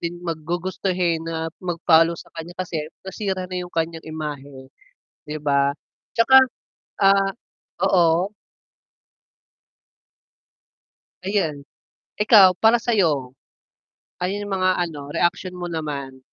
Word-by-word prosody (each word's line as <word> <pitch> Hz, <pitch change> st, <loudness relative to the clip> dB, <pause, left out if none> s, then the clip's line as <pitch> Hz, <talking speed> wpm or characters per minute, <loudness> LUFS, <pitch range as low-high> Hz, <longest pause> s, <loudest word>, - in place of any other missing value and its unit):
din 175 Hz, +1 st, -5 dB
mag 165 Hz, -2 st, -3 dB
gugustuhin 180 Hz, -1 st, -1 dB
na 165 Hz, 0 st, -3 dB
mag 175 Hz, -2 st, -3 dB
follow 165 Hz, 0 st, +5 dB
sa -, -, -12 dB
kanya 170 Hz, +2 st, -7 dB
kasi 165 Hz, -4 st, -3 dB, 0.2 s
nasira 190 Hz, -1 st, -3 dB
na 180 Hz, -1 st, -2 dB
yung 180 Hz, -, -6 dB
kanyang 165 Hz, 0 st, -2 dB
imahe, 145 Hz, -4 st, -7 dB, 0.6 s
'di 150 Hz, -, -3 dB
ba? 140 Hz, -1 st, +1 dB, 0.4 s
'Tsaka 245 Hz, +3 st, +6 dB, 0.7 s
ah 195 Hz, 0 st, +4 dB, 0.6 s
oo. 175 Hz, 0 st, +3 dB, 3.0 s
Ayan. 160 Hz, -8 st, -1 dB, 0.6 s
Ikaw 205 Hz, -4 st, +7 dB
para 225 Hz, +2 st, +6 dB
sayo? 170 Hz, -, +1 dB, 0.9 s
Ano 180 Hz, +1 st, -1 dB
yung 205 Hz, 0 st, -5 dB
mga 185 Hz, -1 st, +2 dB
ano 150 Hz, -5 st, -7 dB
reaksyon 180 Hz, +1 st, 0 dB
mo 175 Hz, -1 st, -5 dB
naman? 140 Hz, -5 st, -5 dB
170 Hz, 110 wpm, -22 LUFS, 155-190 Hz, 3.0 s, Ikaw